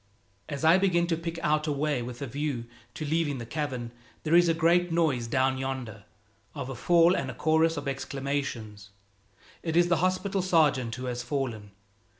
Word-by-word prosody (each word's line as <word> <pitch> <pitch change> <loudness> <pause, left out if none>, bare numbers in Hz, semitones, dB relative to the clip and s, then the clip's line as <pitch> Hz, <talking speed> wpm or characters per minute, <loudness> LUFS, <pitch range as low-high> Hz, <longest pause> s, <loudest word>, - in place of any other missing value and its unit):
As 145 +2 -3
I 165 +4 +6
begin 175 -3 +2
to 170 -1 0
pick 165 0 -5
out 155 0 +1
a - - +1
way 145 -2 0
with 120 +2 -6
a - - -2
view 140 -2 -3 0.3
to 155 - -4
leaving 155 -2 0
the 120 - -6
cavern, 130 -4 -4 0.3
there 160 - -1
is 175 0 +6
a 165 - +2
great 170 +2 +3
noise 150 -8 +1
down 130 +2 +1
yonder 130 -4 -5 0.5
of 130 - -5
a - - -6
fall 170 +7 +4
and 135 -7 -2
a - - -6
chorus 160 +1 +2
of - - -4
exclamations. 135 -7 -4 0.7
It 165 -1 -1
is 175 0 +4
the 170 - +3
hospital 185 +3 0
sergeant 150 -10 +2
who 130 +1 -6
has 125 -1 -3
fallen. 120 -5 -3
145 Hz, 185 wpm, -28 LUFS, 130-165 Hz, 0.7 s, I